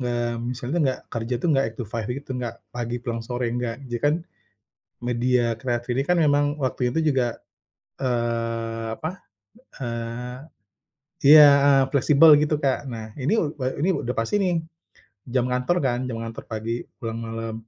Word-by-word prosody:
nggak 120 -1 -1 0.2
misalnya 125 +6 -3
nggak 130 -2 0
kerja 115 +2 -2
tuh 175 - +1
nggak 135 -1 +3
8-5 115 -1 -5
gitu, 135 +2 -5
nggak 120 -2 -5
pagi 120 0 -3
pulang 115 -2 -4
sore, 120 0 -2
nggak. 120 +1 -3
Jadi 120 -1 -2
kan, 145 +1 +4 0.9
media 120 -1 +1
kreatif 120 0 -2
ini 135 - +1
kan 180 0 +3
memang 145 -1 +2
waktunya 125 -1 0
tuh 160 - +2
juga, 130 -4 +2 0.7
eee, 115 -2 -1
apa, 160 +2 -3 0.7
eee, 120 +1 -4 0.9
iya, 150 0 +10 0.2
heeh, 140 -1 +6
fleksibel 150 +3 +7
gitu 150 +1 +1
Kak. 135 +1 0
Nah, 110 -2 -7
ini 140 +11 +1
e 150 -6 -1 0.2
ini 185 - +3
udah 125 -4 -2
pasti 115 - 0
nih. 180 -2 +1 0.7
Jam 125 -1 +1
kantor 125 +7 +1
kan, 125 -3 +1
jam 115 -2 -4
kantor 115 0 -7
pagi 115 +2 -3 0.2
pulang 115 0 -4
malam 115 0 -5
125 Hz, 155 wpm, -24 LUFS, 115-140 Hz, 0.9 s, iya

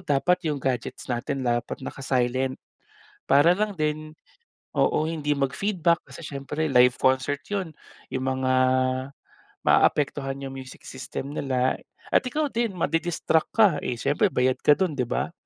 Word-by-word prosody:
dapat 180 +2 +1
'yung 150 - 0
gadgets 125 -1 -3
natin 130 +2 -3
dapat 120 +2 -2
naka-silent, 130 -1 -1 0.7
para 145 +5 +6
lang 205 +2 0
din 155 -1 -2 0.6
oo 155 - +2
hindi 150 -2 -1
mag 135 -2 0
feedback 175 -3 +1
kasi 170 - -10
siyempre 140 +2 -4
live 125 -2 +5
concert 130 +2 +1
'yon. 185 -7 -3 0.3
'Yung 130 0 -3
mga 130 0 0 1.1
maaapektuhan 135 -2 +2
'yung 135 - -6
music 130 -1 -10
system 135 +1 -6
nila 130 -3 0 0.4
at - - +6
ikaw 295 +4 -1
din 230 -5 -1
madi-distract 165 0 0
ka 220 -2 +6
eh 125 - -3
siyempre 145 - +2
bayad 130 -6 +1
ka 145 - +5
dun 180 -1 0
'di 125 -3 -1
ba. - - -2
145 Hz, 145 wpm, -25 LUFS, 130-165 Hz, 1.1 s, para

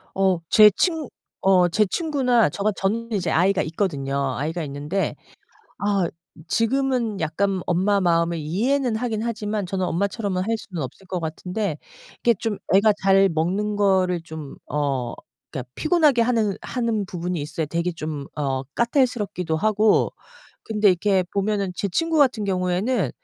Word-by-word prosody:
어 190 -2 +3
제 215 -1 +8
친 320 - -1 0.3
어 185 -2 +5
제 210 +4 +3
친구나 255 - +2
저 200 - -5
같 215 -1 +2
저는 230 +4 -1
이제 180 -6 -1
아이가 185 +3 +3
있거든요. 140 -6 -2
아이가 160 +4 -2
있는데. 145 +7 -2 0.6
아 200 -3 +1 0.4
지금은 240 -3 0
약간 185 +4 0
엄마 195 +3 +2
마음을 170 -1 +2
이해는 230 - 0
하긴 220 -2 -2
하지만 215 -3 -2
저는 185 0 -2
엄마처럼은 195 +1 -1
할 225 0 +1
수는 180 -7 -6
없을 160 +9 -8
것 180 - -2
같은데. 180 +2 -3 0.5
이렇게 235 -1 +4
좀 220 -3 -2 0.2
애가 210 +2 +6
잘 195 0 +5
먹는 185 +6 -1
거를 185 -3 +2
좀 160 -3 -9
어 135 -5 -1 0.4
그러니까 125 -4 -6
피곤하게 310 -7 +3
하느 225 -4 +1
하는 230 -5 -1
부분이 180 -2 -3
있어요. 150 +2 -3
되게 170 +3 -1
좀 155 -3 -5
어 135 -3 -1
까탈스럽기도 235 - 0
하고. 215 +3 +3 0.5
근데 210 -2 +2
이렇게 185 +1 +2
보면은 200 -2 0
제 200 - -2
친구 325 - 0
같은 250 -7 +3
경우에는 185 - 0
195 Hz, 315 characters per minute, -23 LUFS, 170-220 Hz, 0.6 s, 제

